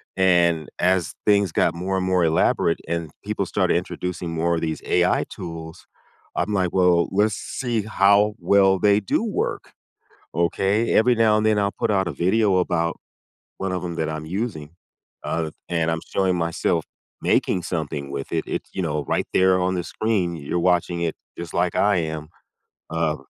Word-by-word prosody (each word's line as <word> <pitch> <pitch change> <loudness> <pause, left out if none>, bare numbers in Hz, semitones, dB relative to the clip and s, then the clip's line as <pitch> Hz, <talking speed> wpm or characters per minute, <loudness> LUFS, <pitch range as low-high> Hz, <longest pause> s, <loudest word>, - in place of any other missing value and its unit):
And 85 -4 +3
as 90 -3 +1
things 100 -3 +3
got - - +2
more 95 +3 -2
and 95 - -1
more 90 -1 +2
elaborate 80 +1 +2
and 85 -2 -2 0.2
people - - -2
started - - +1
introducing 90 -1 -4
more 85 +1 0
of 80 - -2
these 80 -1 -2
AI - - +2
tools, 80 -1 -8 0.5
I'm 100 +4 -1
like, 95 -2 +1
"Well, 90 -2 +3
let's 105 +2 +2
see 120 -2 -2
how 105 0 +3
well 95 -1 +4
they 100 +1 +4
do 105 - 0
work." 220 -3 -3 0.6
Okay? 95 +6 +1
Every 125 +3 +5
now 110 -1 +4
and 110 - 0
then, 110 -1 +3
I'll 100 0 +1
put 115 - -1
out 95 -2 +1
a - - -2
video 95 +2 +2
about 85 -2 0 0.6
one 95 -1 -2
of 90 - -2
'em 85 -1 -4
that 80 -1 -1
I'm 80 0 -5
using, 85 -4 -4 0.5
uh, 80 -2 -2 0.2
and 85 -1 0
I'm 80 0 -2
showing 95 -2 +2
myself 85 0 0 0.4
making 90 - +1
something 75 -4 -4
with 70 -1 -5
it. - - 0
It's, - - -4
you 95 - -2
know, 75 -4 -2
right - - 0
there 95 0 +4
on 90 +1 0
the 90 - -2
screen, 100 -6 -1
you're 80 +3 -3
watching 90 -1 +1
it 85 -2 -1 0.2
just 85 -1 -7
like - - +1
I 100 -1 +3
am. 80 -2 -3 0.6
Um 80 -2 -1
90 Hz, 175 wpm, -23 LUFS, 85-100 Hz, 0.6 s, Every